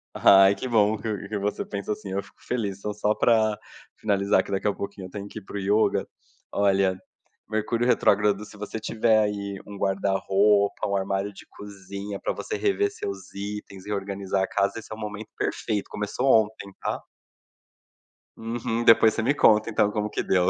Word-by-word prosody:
Ai, 95 0 +7
que 130 - -5
bom 110 -2 +3
que 105 -1 -4
que 105 - -3
você 105 +1 -2
pensa 100 +1 -4
assim. 105 -2 -8
Eu 100 +1 -1
fico 100 - -21
feliz. 105 -6 -2
Então, 105 +1 -4
só 105 +1 0
pra 110 -2 +3 0.4
finalizar, 100 -2 +2
que - - -10
daqui 100 +2 0
a 100 - +2
pouquinho 100 -2 -6
eu - - -15
tenho 100 +1 -7
que 110 - -8
ir - - -18
para 100 - -7
o - - -2
yoga, 100 +3 +2 0.4
olha, 95 -2 +2 0.5
Mercúrio 110 +2 0
retrógrado, 105 -3 +3
se 105 - -14
você 105 +2 -5
tiver 110 0 +2
aí 100 -2 -2
um 100 - -8
guarda-roupa, 100 +1 +2
um 100 - -1
armário 100 +1 -1
de - - -13
cozinha, 100 0 -8
pra - - -1
você 430 - -4
rever 405 0 +1
seus 410 -2 -7
itens 100 -1 -7
e - - -8
reorganizar 100 -1 -2
a - - -1
casa, 100 +2 0
esse 110 - -13
é - - -5
o - - -13
momento 105 0 -6
perfeito. 105 -2 -2
Começou 105 +6 -2 0.2
ontem, 105 -2 -11
tá? - - -3 1.3
Uhum, 115 0 -3
depois 115 -1 +6
você 110 - -1
me 130 +6 +2
conta, 110 -3 +5
então, 105 -2 +2
como 105 0 -2
que - - -2
deu. 90 -1 +3
105 Hz, 190 wpm, -25 LUFS, 100-110 Hz, 1.3 s, Ai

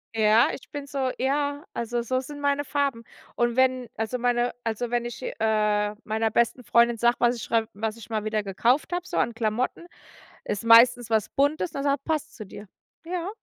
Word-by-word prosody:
ja, 220 +2 +5
ich - - -10
bin 285 -2 -6
so 270 -2 -1
ja, 285 +2 -1
also, 235 +1 -2
so 255 +2 -1
sind 290 +2 -9
meine 285 0 +1
Farben. 280 -5 -1 0.3
Und 240 -1 +1
wenn 255 -2 +2
also, 225 +3 -2
meine 245 0 +1
also, 230 +1 -2
wenn 240 0 +1
ich, 240 +2 -7
äh, 210 -2 0
meiner 220 0 0
besten 235 +2 +1
Freundin 235 +1 +3
sage, 240 +2 +2
was 240 0 +3
ich - - -7
schrei 225 -1 +1
was 220 +2 -3
ich 230 0 -12
mal 215 -2 -2
wieder 215 0 0
gekauft 235 - +1
habe, 355 0 -2
so - - -4
an 235 - +1
Klamotten, 225 +7 -2 0.6
ist 205 +1 -3
meistens 235 +1 +6
was 220 -2 +1
Buntes, 290 +4 0
dann 275 - -4
sagt: 280 -1 0
„Passt 315 -1 -2
zu 215 - -7
dir. 205 +2 -11 0.4
Ja, 355 +1 -3
240 Hz, 195 wpm, -25 LUFS, 220-275 Hz, 0.6 s, meistens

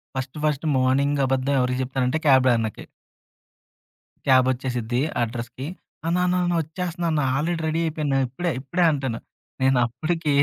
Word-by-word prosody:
First 130 +2 -4
first 150 0 0
morning 140 +3 +2
అబద్ధం 135 +1 0
ఎవరికి 125 0 0
చెప్తానంటే 130 +2 -1
క్యాబ్ 130 -2 +6
అన్న‌కి. 110 -2 -3 1.4
క్యాబ్ 130 -2 +5
ఒచ్చేసిద్ది 125 -2 -2 0.2
అడ్రెస్‌‌కి. 120 +3 -5 0.4
అన్న, 170 +2 +1
అన్న, 180 0 +1
అన్న 175 - +1
వచ్చేస్తున్న 175 +2 -4
అన్న. 155 -1 +1
ఆల్రెడీ 165 +4 -1
రెడీ 160 +1 0
అయిపోయాను. 150 -3 -1
ఇప్పుడే 170 +8 -2
ఇప్పుడే 175 +7 0
అంటాను. 135 -6 -2 0.4
నేను 130 0 +4
అప్పటికి 155 +5 -1
135 Hz, 140 wpm, -24 LUFS, 130-155 Hz, 1.4 s, క్యాబ్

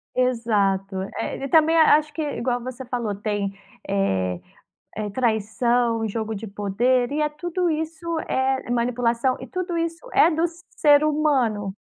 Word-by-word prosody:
Exato, 205 -6 +1 0.2
é. - - -3
E - - -2
também 320 +1 +5
a 315 -2 +7
acho 300 -1 -5
que, 320 - -4
igual 245 -4 -2
você 255 0 -7
falou, 235 -4 -2
tem, 205 -1 -2 0.3
eh 95 - 0 0.6
eh, 215 -1 -3
traição, 230 0 +1
jogo 220 +1 -3
de 215 +2 -6
poder. 240 +6 0
E 300 0 +1
tudo 350 +3 -2
isso 320 +1 -3
é 265 -1 0
manipulação. 240 +1 +1
E 260 - -7
tudo 360 0 -3
isso 335 +7 -4
é - - +6
do 320 +2 +1 0.4
ser 295 0 +6
humano. 265 -10 +1
245 Hz, 145 wpm, -23 LUFS, 215-305 Hz, 0.6 s, a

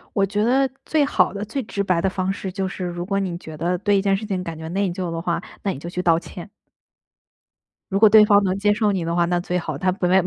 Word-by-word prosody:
我 195 -2 +3
觉 205 +2 -1
得 265 +3 +3 0.2
最 305 -2 +2
好 280 - +2
的 200 +1 -4
最 260 +5 -4
直 200 -2 -3
白 180 -3 +1
的 190 - +1
方 185 0 -1
式 195 -1 -5
就 190 0 -3
是 185 -1 -6
如 175 0 -4
果 195 -1 0
你 180 -3 -3
觉 160 -3 -10
得 175 +3 -1
对 205 0 +2
一 195 - +2
件 195 -1 +2
事 215 - -6
情 190 -3 -2
感 165 -2 -6
觉 160 0 -7
内 195 +2 0
疚 175 0 -4
的 165 0 -3
话， 170 0 -1 0.2
那 195 - 0
你 - - -7
就 170 - -7
去 180 +1 -3
道 165 -2 +4
歉。 180 +2 -10 1.4
如 195 - +1
果 215 0 +7
对 215 0 +8
方 205 -1 +5
能 185 0 0
接 205 +1 +2
受 210 -1 +1
你 180 -4 -2
的 170 +1 -2
话， 170 - +3
那 175 0 0
最 180 0 -2
好。 160 -4 -4
他 185 +6 +1
本 180 -1 -1
来 190 0 +4
没 - - -4
190 Hz, 310 characters per minute, -22 LUFS, 175-200 Hz, 1.4 s, 对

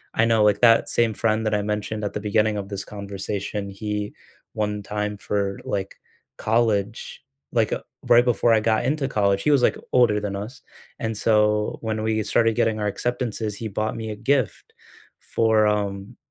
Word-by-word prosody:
I 110 - +4
know 115 -2 +3
like 105 -1 +3
that 115 -1 +5
same 115 -2 +2
friend 110 +1 0
that 110 - 0
I 105 - +1
mentioned 105 +1 -3
at 100 - -3
the - - -3
beginning 105 0 +1
of 100 -1 -5
this 100 -2 -4
conversation, 100 0 -5
he, 105 +1 -4 0.4
one 105 -1 -2
time 105 +1 -3
for, 100 -1 -2
like, 100 -1 -3 0.4
college, 110 -1 0 0.3
like, 115 -2 +2
uh, - - -3 0.3
right 120 +1 +6
before 120 -1 +2
I 110 - +4
got 110 0 +1
into 140 0 0
college, 100 -5 +1
he 150 - +3
was, 140 - +4
like, - - +3 0.2
older 120 -4 +4
than 100 -1 -3
us 110 +7 -7 0.4
and 110 -1 -2
so 105 -1 +2
when 110 -1 -2
we 110 -1 0
started 115 +1 +2
getting 110 0 +1
our 105 - -1
acceptances, 115 -1 -2
he 110 +2 -5
bought 110 +2 -2
me 110 -1 -5
a 105 - -5
gift 130 +1 -1 0.5
for, 110 -2 +2
um, 100 -2 -2
105 Hz, 185 wpm, -23 LUFS, 105-115 Hz, 0.5 s, right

